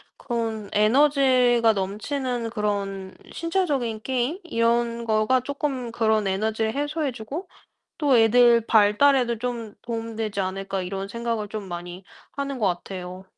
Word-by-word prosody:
그런 225 -4 -3
에너지가 250 0 +4
넘치는 230 +5 -3
그런 200 -3 -3 0.2
신체적인 290 - -1
게임 260 +7 -1
이런 235 -3 +1
거가 220 +3 +2
쪼끔 270 -2 -3
그런 220 -2 +1
'에너지를 220 +3 0
해소해 290 0 -1
주고 270 - -7 0.5
또 285 -5 +3
애들 235 +1 +5
발달에도 235 +3 +4
좀 235 -2 -4
도움 230 -1 -5
되지 215 -3 -2
않을까?' 195 0 -3
이런 195 +2 -4
생각을 230 0 -3
좀 205 -2 -6
많이 175 +1 -7 0.3
하는 280 -1 -4
것 215 - +1
같아요. 185 0 -4
230 Hz, 285 characters per minute, -24 LUFS, 210-255 Hz, 0.5 s, 애들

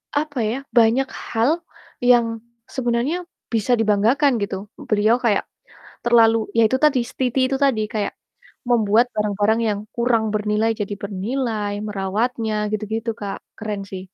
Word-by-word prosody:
apa 290 -3 -1
ya, 230 +5 -1
banyak 240 +3 +4 0.2
hal 285 +10 +2 0.4
yang 235 -2 +3 0.3
sebenarnya 260 +8 -1 0.3
bisa 225 +3 +2
dibanggakan, 225 +6 +3
gitu, 200 0 -4 0.2
beliau 215 +2 +4
kayak 220 -5 +2 0.6
terlalu 230 -1 +5 0.2
iya 230 -1 +5
itu 260 - +2
tadi 280 -4 +4
setiti 255 0 -1
itu - - +1
tadi, 235 -6 +2
kayak 210 -2 -1 0.5
membuat 230 0 +4
barang-barang 210 +1 +1
yang 205 -1 0 0.2
kurang 235 -2 +1
bernilai 210 +1 +1
jadi 205 -1 -3
bernilai, 210 +1 -2 0.2
merawatnya 215 +3 -1 0.2
gitu 215 0 -2
gitu, 225 +1 -2
Kak, 200 -1 -4 0.2
keren 210 -2 -4
sih. 190 -1 -7
225 Hz, 135 wpm, -21 LUFS, 210-245 Hz, 0.6 s, terlalu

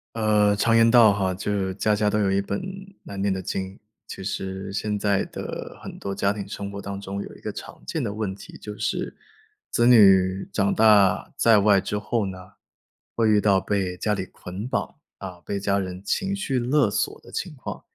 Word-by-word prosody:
呃， 105 -2 +3
常 115 +2 +3
言 115 0 +6
道 115 -4 +7
哈， 95 -2 0
就 95 +3 -4
是 95 -2 -1
家 105 +1 +1
家 105 0 +1
都 105 - +1
有 100 - +2
一 95 +1 +2
本 100 0 -3 0.4
难 100 -1 -6
念 100 -1 +1
的 95 - -3
经。 95 +1 -4 0.3
其 - - -8
实 95 0 -4
现 105 0 -2
在 100 -1 +1
的 - - -7
很 - - -8
多 100 - -4
家 100 +1 +1
庭 105 -2 -5
生 100 0 -6
活 100 0 -7
当 100 0 -5
中 100 0 -5
有 - - -10
一 - - -18
个 - - -5
常 - - -10
见 - - -2
的 100 - -2
问 105 -3 -3
题， 100 - -12
就 105 0 -8
是 - - -2 0.5
子 120 - +2
女 95 -5 +5
长 100 0 +1
大 105 -4 +4
在 115 -2 +5
外 100 -1 +5
之 100 +2 -3
后 105 +1 -1
呢， 95 -1 -5 0.8
会 115 -1 +2
遇 105 -1 +5
到 100 -2 +3
被 95 -3 -1
家 105 +4 -1
里 95 -2 -2
捆 95 +4 -8
绑， - - -2 0.2
啊， 90 -2 -8
被 100 - -2
家 100 0 +1
人 90 0 -5
情 195 - -1
绪 145 -10 -1
勒 125 -1 +2
索 105 - -1
的 - - -15
情 - - -4
况。 - - -7
100 Hz, 225 characters per minute, -24 LUFS, 95-105 Hz, 0.8 s, 道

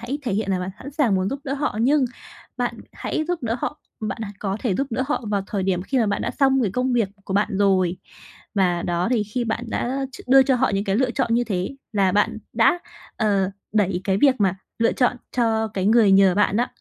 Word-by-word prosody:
hãy 250 +5 -4
thể 245 - -2
hiện 205 -1 -1
là 190 - +1
bạn 180 +1 -3
sẵn 280 - -8
sàng 265 -8 +2
muốn 185 0 +1
giúp 275 - -4
đỡ 275 - -2
họ, 285 -5 -2
nhưng 280 +3 +4 0.5
bạn - - -1 0.2
hãy 310 - -3
giúp 355 -4 -2
đỡ 230 0 -1
họ, 300 - -3 0.2
bạn 215 0 -3 0.2
có 195 -1 -2
thể 225 -7 0
giúp 275 - 0
đỡ 255 +3 -1
họ 295 -5 -1
vào 200 -2 0
thời 200 -2 -2
điểm 185 -1 0
khi 265 +7 -1
mà 225 - +2
bạn 205 - -1
đã - - -1
xong 270 -2 +2
cái 200 -5 -1
công 250 +2 0
việc 230 -5 +2 0.2
của 190 - -4
bạn 205 +1 +2
rồi. 185 -3 +2 0.6
Và 180 -3 +2
đó, 175 +1 0
thì 240 -4 +2
khi 215 +4 -3
bạn 235 +1 -2
đã 265 +4 -2
ch - - -10
đưa 270 +1 +8
cho 260 -1 +2
họ 260 - +2
những 195 +1 0
cái 195 -1 0
lựa 255 +1 +2
chọn 240 -2 0
như 240 +1 +2
thế 185 -5 -2 0.2
là 195 -3 +2
bạn 210 +2 +1
đã, 230 +10 +4 0.4
ờ, 200 -3 +1 0.2
đẩy 195 -4 +1
cái 190 -1 +1
việc 275 0 +5
mà 195 -2 +3 0.2
lựa 230 - +3
chọn 245 -1 +1 0.2
cho 225 -2 +1
cái 195 -2 -2
người 220 -2 +5
nhờ 195 -1 +6
bạn 205 +1 +2
đó. 245 - +2
220 Hz, 245 wpm, -23 LUFS, 195-255 Hz, 0.6 s, đưa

